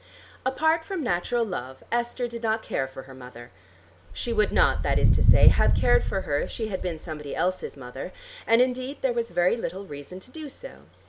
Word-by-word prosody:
Apart 315 +5 +2
from 360 -1 -4
natural 230 +4 0
love, 130 - -6
Esther 240 +1 -1
did 235 -1 -7
not 220 -1 0
care 135 - -2
for 130 0 -10
her 135 - -13
mother. 125 -2 -11 0.6
She 235 - -3
would 215 -2 +2
not, - - +3
that - - +1
is - - +5
to - - +2
say, - - +8
have - - +3
cared - - +4
for 195 - -2
her 145 -5 0
if - - -3
she 220 -2 -4
had 190 - -3
been 175 -3 -3
somebody 155 -3 -7
else's 185 -4 -2
mother, 125 -2 -7 0.4
and 230 +2 +6
indeed 255 +2 -3
there 260 -2 +2
was 235 -1 -2
very 175 +3 +2
little 200 -4 -5
reason 145 +3 -9
to 255 - -14
do 310 -1 -8
so. - - -12
210 Hz, 210 wpm, -26 LUFS, 150-245 Hz, 0.6 s, say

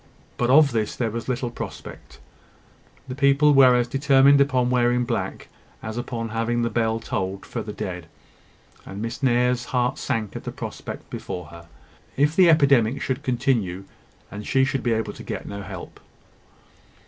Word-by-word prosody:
But 120 - 0
of 145 +1 +6
this 110 -2 -1
there 115 -3 -1
was 115 +3 -5
little 125 -1 -2
prospect: - - -9 0.9
the 130 - -5
people 140 +2 +4
were 130 -2 +7
as 120 -1 +1
determined 140 +1 +4
upon 130 -3 +2
wearing 125 0 +2
black, - - -3 0.4
as 110 0 -5
upon 120 -1 -4
having 115 +1 -1
the 115 - -1
bell 115 0 0
tolled 95 -3 -4
for 115 - -5
the 105 - -6
dead; 90 -4 -6 0.8
and 95 - -8
Miss 115 +5 -5
Nares's 125 -1 +2
heart 125 +1 -1
sank 115 -6 -3
at - - -6
the - - -5
prospect - - -7
before 90 -2 -6
her, 85 0 -13 0.5
if 145 +3 +2
the 180 -2 +6
epidemic 140 -6 +4
should 130 -1 -2
continue, 120 -8 -1 0.5
and 105 0 -7
she 135 0 +3
should 135 0 -2
be 120 - +1
able 110 0 -2
to - - -11
get - - -6
no 100 0 -6
help. 95 -2 -9
120 Hz, 170 wpm, -23 LUFS, 110-135 Hz, 0.9 s, were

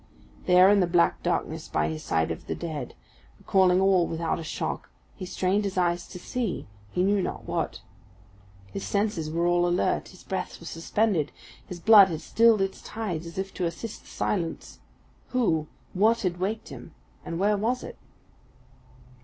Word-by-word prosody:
There 180 +1 +7
in 205 0 +5
the 180 - +3
black 170 0 +2
darkness - - -2
by 75 0 0
the 80 0 -4
side 80 +1 0
of 80 - -7
the - - -2
dead, 155 -7 -5 0.4
recalling 185 -1 +3
all 190 -3 +4
without 165 0 -2
a - - -5
shock, 155 - -4 0.2
he 185 - -7
strained 190 +3 0
his 195 -2 -3
eyes 175 -1 +1
to 180 - -9
see 220 +2 -3 0.3
he 180 - +1
knew 200 +1 +3
not - - -4
what. - - -3 0.9
His 195 - -4
senses 200 -6 -1
were 170 +2 0
all 175 0 +3
alert, 175 +1 +1
his 185 - -15
breath 190 - -4
was 170 - -8
suspended, 170 -1 0 0.4
his 180 -3 -7
blood 210 0 +8
had 165 -4 -4
stilled 225 +4 +4
its 195 0 -4
tides 180 -7 -4
as 170 - -10
if 190 0 -3
to 180 - -2
assist 210 +6 -6
the - - -21
silence. 170 -5 -3 0.5
Who 165 -12 +1 0.3
what 220 +5 +3
had 180 -4 -1
waked 210 +4 -2
him, - - -11 0.3
and 165 - -4
where 205 +3 +3
was 230 +5 -1
it? - - -9
185 Hz, 175 wpm, -27 LUFS, 170-205 Hz, 0.9 s, blood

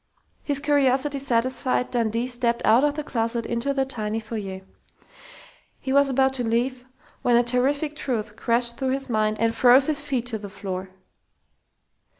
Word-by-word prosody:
His 285 -2 +2
curiosity 285 -1 +1
satisfied, 255 0 0
Dundee 230 -1 0
stepped 240 -1 0
out 230 +5 +5
of 295 -1 +1
the 300 - -4
closet 230 -3 -2
into 235 +4 -2
the 270 -1 0
tiny 220 -4 -3
foyer. 210 -4 -6 1.2
He 265 - -3
was 280 0 +5
about 265 0 +2
to - - -1
leave 245 +2 -1 0.4
when 245 - +3
a 240 - +5
terrific 280 +5 0
truth 225 -8 -3
crashed 235 +1 -1
through 260 -1 -1
his 270 -1 -3
mind 215 -1 +1
and 230 0 +1
froze 255 +3 +6
his 295 -1 -1
feet 270 -5 -2
to 230 -3 -4
the 200 -1 -8
floor. 190 -1 -6
245 Hz, 160 wpm, -24 LUFS, 230-270 Hz, 1.2 s, froze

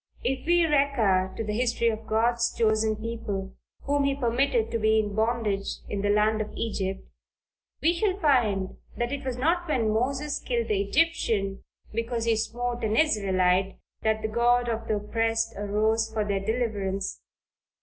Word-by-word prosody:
If 265 +2 -2
we 345 0 +4
recur 240 -11 +2
to - - -2
the 210 -1 -3
history 235 0 +1
of 220 0 -5
God's 235 +2 +2
chosen 220 -1 +2
people, 215 -3 -4 0.3
whom 285 0 +1
he 275 0 +1
permitted 245 -2 +1
to 230 - -1
be 220 0 +3
in 210 -2 0
bondage 220 -2 -1
in 200 - -2
the 205 - 0
land 215 +1 +3
of 215 - -4
Egypt, 195 -4 -3 0.8
we 330 +2 +4
shall 380 +2 0
find 220 - +2 0.2
that 240 +1 -1
it 280 0 -4
was 260 -2 -3
not 340 +6 +1
when 230 -8 +1
Moses 275 +6 -1
killed 235 -2 -2
the 205 -2 +2
Egyptian 205 -6 0 0.3
because 230 +1 -2
he 230 -1 +3
smote 240 +2 -3
an 220 0 +1
Israelite, 190 -8 +2 0.2
that 220 0 0
the - - +1
God 240 +2 +2
of 230 0 -3
the 215 - +1
oppressed 225 +2 -1
arose 215 +2 0
for 215 -1 -1
their 200 -1 0
deliverance. 200 -4 -2
225 Hz, 165 wpm, -27 LUFS, 210-245 Hz, 0.8 s, we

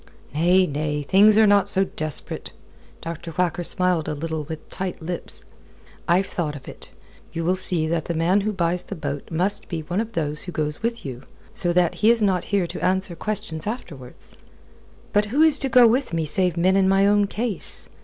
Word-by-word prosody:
"Nay, 175 +5 +4
nay: 150 -1 -2
things 205 +7 +5
are 220 - +7
not 200 -1 +4
so 195 -1 +4
desperate." 155 -5 -5 0.5
Dr. 165 0 -6
Whacker 180 -1 0
smiled 180 -2 +2
a - - -2
little 160 0 -4
with 155 0 -8
tight 190 -1 -5
lips. 175 +2 -5 0.6
"I've 180 +2 +3
thought 155 -6 -3
of 140 - -11
it. - - -11 0.4
You 165 - -3
will 180 +2 +2
see 180 -3 0
that 165 -1 -1
the 170 - -3
man 175 +5 +2
who 215 +2 -1
buys 175 -2 0
the 200 - -6
boat 145 -4 -5
must 185 +5 -1
be 165 -3 -3
one 175 +6 -2
of 230 0 -6
those 150 -3 -2
who 180 - -6
goes 150 -1 -3
with 230 -2 -3
you 130 -2 -6 0.3
so 210 -7 0
that 175 -1 +3
he 215 - +5
is 235 0 +4
not 185 -3 +1
here 200 -3 +1
to - - -7
answer 190 -1 +1
questions 165 -4 -4
afterwards." 145 - -8 0.8
"But 205 0 +3
who 270 +9 +2
is 315 -3 +5
to 270 - -1
go 245 0 +7
with 245 -1 +2
me 165 -1 0
save 180 +2 0
men 185 +3 +3
in 190 -1 +3
my 195 +1 +4
own 205 0 +3
case? 215 -1 -4
180 Hz, 205 wpm, -23 LUFS, 160-205 Hz, 0.8 s, are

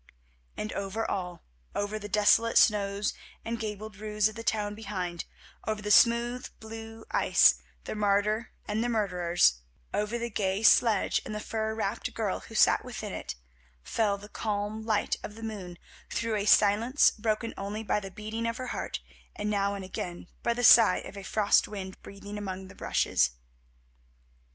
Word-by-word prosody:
And 215 - -4
over 200 +3 -3
all, 180 -3 -4 0.3
over 205 +1 -2
the 205 0 -7
desolate 210 +3 +4
snows 200 -1 +3 0.3
and 230 0 -3
gabled 215 -1 -5
roofs 210 0 +1
of 215 - -6
the 230 - -7
town 210 -2 0
behind; 185 -5 -4 0.4
over 215 -1 -1
the 210 - -1
smooth 235 +3 +4
blue 225 0 -9
ice, - - +5 0.2
the - - -5
martyr 210 +2 +1 0.2
and 215 +2 0
the 240 - 0
murderers; 175 - +2 0.3
over 210 +3 -1
the 235 0 -4
gay 195 0 -1
sledge 220 -1 +4
and 215 - -6
the - - -3
fur 220 0 -3
wrapped 215 0 -3
girl 215 -4 -1
who 225 - -12
sat - - +5
within 220 -5 -6
it, - - -5 0.5
fell 205 - 0
the 205 +1 -11
calm 210 0 -3
light 215 -2 +1
of 210 - -8
the 225 - -10
moon 195 -6 -6 0.3
through 230 -1 -2
a 205 -1 -1
silence 215 +8 +5
broken 220 +1 -2
only 205 +3 -4
by 210 - +1
the 195 -1 -8
beating 215 +4 -4
of 230 +1 -2
her 255 - -5
heart, - - -4 0.3
and 210 0 -2
now 200 -1 +1
and 195 -1 -6
again 175 -2 -6 0.2
by 235 - 0
the 245 - -2
sigh 220 -5 +8
of 205 - -8
a 200 - -7
frost 205 +1 +3
wind 190 -2 -7
breathing 200 +1 -8
among 190 -2 -6
the - - -13
rushes. - - +1
210 Hz, 170 wpm, -29 LUFS, 200-225 Hz, 0.5 s, sigh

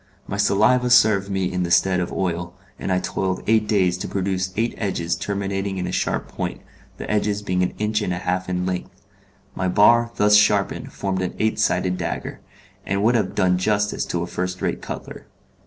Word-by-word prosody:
My 100 - -4
saliva 110 +5 +3
served 105 -5 +4
me 95 -2 -1
in 90 - -1
the 85 - -1
stead 90 +2 +3
of 90 - -2
oil, 90 -1 -2 0.2
and - - -3
I 90 - +3
toiled 95 0 -2
eight 110 0 +2
days 90 -4 +2
to - - -4
produce 95 -1 -2
eight 115 +2 0
edges 85 -5 -1
terminating 100 -1 -3
in 90 - -2
a 90 - -3
sharp - - -1
point, - - -5 0.4
the - - -7
edges 105 -1 0
being 90 -2 0
an 90 - -1
inch 105 0 0
and 90 - -2
a 90 - -1
half 90 +1 -2
in 90 0 -1
length. 90 -1 -5 0.5
My 95 - -2
bar 115 +5 +5
thus 105 0 +4
sharpened 105 -1 +2
formed 95 -2 -2
an 90 - -3
eight 110 0 0
sided 90 -3 +1
dagger, - - -4 0.4
and 100 +1 -1
would 115 +3 +4
have 105 -6 0
done 90 0 +2
justice 105 +1 0
to 85 -1 -2
a - - -2
first 90 +1 -4
rate - - -2
cutler. - - -8
95 Hz, 200 wpm, -22 LUFS, 90-105 Hz, 0.5 s, bar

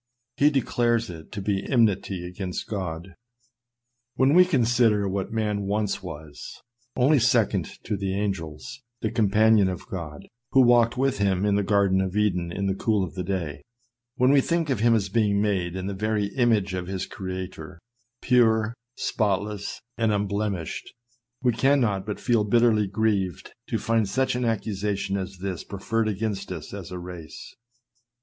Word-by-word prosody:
He 145 - +5
declares 120 -5 +1
it 80 -2 -11
to 100 - -5
be 100 -1 0
enmity 100 -7 +1
against 90 0 -5
God. 90 -3 -5 1.0
When 135 +2 +3
we 180 +2 +7
consider 120 - +2
what 95 0 -3
man 105 -3 -1
once 105 0 -1
was, 80 -5 -9 0.4
only 140 +3 +4
second 110 -7 +2
to 105 - -2
the 95 0 -2
angels, 95 - -4 0.2
the 110 - -1
compan 110 0 +4
ion 95 -2 +3
of 90 -2 -6
God, 80 -6 -7 0.3
who 135 - +7
walked 120 -1 +4
with 135 -4 +1
him 100 -1 +1
in 105 - +2
the 100 - +2
garden 100 -1 +2
of 95 +1 -2
Eden 90 -5 +1
in 100 +3 -3
the 95 - +1
cool 105 0 +1
of 90 - -5
the 90 - -4
day; 85 -6 -3 0.5
when 130 0 +4
we 140 -1 +5
think 165 -1 0
of 125 - 0
him 115 +1 +4
as 100 -3 0
being 100 0 +1
made 95 -4 0
in 95 0 -4
the 100 - -3
very 105 0 -1
image 110 -7 +2
of 90 -1 -3
his 95 -1 -3
Creator, 95 -3 -7 0.5
pure, 115 -3 +3 0.2
spotless, 105 -1 -2 0.2
and 110 -1 +2
unblemished, 100 -4 -2 0.5
we 125 - +4
cannot 115 -8 +2
but 105 - -4
feel 120 -4 +2
bitterly 110 -1 +3
grieved 100 -3 -1
to - - -1
find 115 -3 +1
such 130 +5 +1
an 125 0 -1
accusation 100 -3 -1
as 95 -1 -4
this 95 -1 -4
preferred 110 +3 -2
against 100 -2 -3
us 85 -1 -7
as 100 -4 -7
a 90 - -6
race. 90 -3 -9
100 Hz, 165 wpm, -25 LUFS, 95-115 Hz, 1.0 s, we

